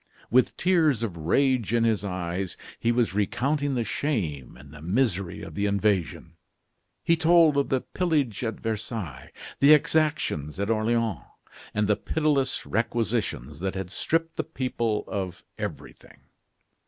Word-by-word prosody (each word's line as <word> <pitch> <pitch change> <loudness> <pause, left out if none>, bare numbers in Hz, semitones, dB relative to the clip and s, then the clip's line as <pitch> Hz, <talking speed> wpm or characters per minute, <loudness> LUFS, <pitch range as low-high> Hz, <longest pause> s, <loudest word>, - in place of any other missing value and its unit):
With 130 +2 +3
tears 160 - +3
of 100 -7 -3
rage 120 - +1
in 115 - +3
his 110 -3 +1
eyes, 90 -1 -3 0.2
he 115 - +2
was 120 -4 +1
recounting 140 +7 0
the 120 - +1
shame 95 - -2
and 70 +1 -14
the 75 - -11
misery 95 -1 0
of - - -8
the 100 0 0
invasion. 100 -5 0 0.7
He 170 - +4
told 165 -2 +5
of 140 -1 +1
the 130 -1 +1
pillage 145 - -1
at 110 -2 -3
Versailles, 110 - -4 0.3
the 140 +2 +8
exactions 150 - 0
at 100 +3 0
Orleans, 110 - +1 0.6
and 105 0 +2
the 105 - +3
pitiless 145 -4 0
requisitions 110 - -1
that 95 +2 -2
had 95 -1 -5
stripped 165 +8 -1
the - - 0
people 120 -4 -2
of 95 -3 -4 0.2
everything. - - -7
115 Hz, 140 wpm, -26 LUFS, 95-135 Hz, 0.7 s, the